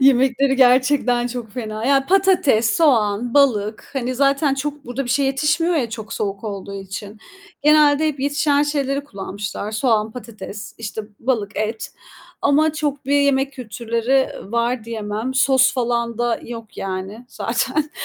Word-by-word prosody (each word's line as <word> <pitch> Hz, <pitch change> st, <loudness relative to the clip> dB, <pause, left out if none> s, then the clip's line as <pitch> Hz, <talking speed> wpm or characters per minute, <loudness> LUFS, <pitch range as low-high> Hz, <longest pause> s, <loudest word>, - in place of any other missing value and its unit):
yemekleri 265 Hz, 0 st, +4 dB
gerçekten 255 Hz, -1 st, +3 dB
çok 245 Hz, -3 st, -6 dB
fena. 220 Hz, -2 st, -5 dB
Ya, 275 Hz, -1 st, +3 dB
patates, 355 Hz, -, +3 dB
soğan, 235 Hz, -6 st, +2 dB
balık 220 Hz, -7 st, +2 dB
hani 255 Hz, -2 st, -2 dB
zaten 275 Hz, +1 st, +2 dB
çok 290 Hz, +1 st, -4 dB
burada 245 Hz, +3 st, -4 dB
bir 245 Hz, -, -4 dB
şeye 280 Hz, +2 st, +2 dB
yetişmiyor 305 Hz, +6 st, +1 dB
ya 240 Hz, -6 st, -1 dB
çok 220 Hz, -1 st, -7 dB
soğuk 200 Hz, +1 st, -3 dB
olduğu 200 Hz, -1 st, -6 dB
için, 200 Hz, +2 st, -7 dB, 0.4 s
genelde 300 Hz, 0 st, +5 dB
hep 280 Hz, -3 st, -4 dB
yetişen 285 Hz, +1 st, +2 dB
şeyleri 280 Hz, -1 st, -1 dB
kullanmışlar. 200 Hz, -1 st, -6 dB
Soğan, 220 Hz, -2 st, +1 dB
patates, 215 Hz, -3 st, -9 dB
işte 220 Hz, -1 st, -5 dB, 0.2 s
balık, 225 Hz, -5 st, -2 dB
et 215 Hz, +1 st, -3 dB, 0.5 s
ama 305 Hz, +2 st, +3 dB
çok 290 Hz, -2 st, -3 dB
bir 285 Hz, +1 st, +2 dB
yemek 275 Hz, -1 st, +2 dB
kültürleri 235 Hz, +2 st, -1 dB, 0.2 s
var 235 Hz, 0 st, 0 dB
diyemem. 220 Hz, +2 st, -4 dB
Sos 265 Hz, 0 st, +4 dB
falan 235 Hz, -2 st, -1 dB
da 240 Hz, -1 st, 0 dB
yok 230 Hz, -2 st, -9 dB
yani 195 Hz, +5 st, -5 dB
zaten. 265 Hz, +5 st, -1 dB
250 Hz, 145 wpm, -20 LUFS, 220-280 Hz, 0.5 s, genelde